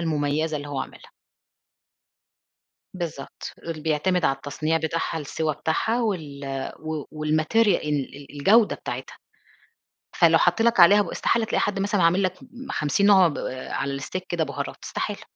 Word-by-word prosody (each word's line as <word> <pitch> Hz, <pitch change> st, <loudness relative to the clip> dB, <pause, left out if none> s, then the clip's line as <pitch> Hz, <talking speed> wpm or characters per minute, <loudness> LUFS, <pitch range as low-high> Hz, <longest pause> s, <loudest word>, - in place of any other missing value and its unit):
المميزة 155 Hz, -1 st, 0 dB
اللي 145 Hz, 0 st, -6 dB
هو 140 Hz, -2 st, -3 dB
عاملها. -, -, -9 dB, 1.8 s
بالضبط. 165 Hz, -7 st, -6 dB, 0.2 s
ال 160 Hz, -2 st, -4 dB
بيعتمد 160 Hz, +3 st, +1 dB
على 135 Hz, -, +2 dB
التصنيع 155 Hz, +4 st, -1 dB
بتاعها، 160 Hz, +1 st, -2 dB
السوى 155 Hz, +1 st, -2 dB
بتاعها 190 Hz, -, 0 dB
وال 155 Hz, -10 st, -3 dB, 0.3 s
و 155 Hz, -2 st, -4 dB, 0.2 s
والmaterial 155 Hz, +9 st, +2 dB, 0.2 s
ال 145 Hz, -3 st, -2 dB
ال 140 Hz, 0 st, -12 dB
الجودة 210 Hz, +9 st, +5 dB
بتاعتها. -, -, -7 dB, 1.0 s
فلو -, -, +6 dB
حَط 225 Hz, -, +2 dB
لك 235 Hz, -2 st, +3 dB
عليها 200 Hz, +4 st, +8 dB
ب -, -, -3 dB
استحالة 230 Hz, -1 st, +1 dB
تلاقي -, -, 0 dB
حد 200 Hz, -1 st, -1 dB
مثلًا 200 Hz, -1 st, +1 dB
عامل 180 Hz, +4 st, +4 dB
لك 185 Hz, -, +1 dB
م 260 Hz, +1 st, -10 dB
50 155 Hz, +7 st, +1 dB
نوع 190 Hz, -3 st, +7 dB
ب 150 Hz, -, -4 dB, 0.3 s
على 140 Hz, 0 st, -2 dB
الsteak 185 Hz, +6 st, -4 dB
كده 170 Hz, -2 st, 0 dB
بُهارات -, -, -5 dB
استحالة. -, -, -4 dB
160 Hz, 150 wpm, -24 LUFS, 150-200 Hz, 1.8 s, عليها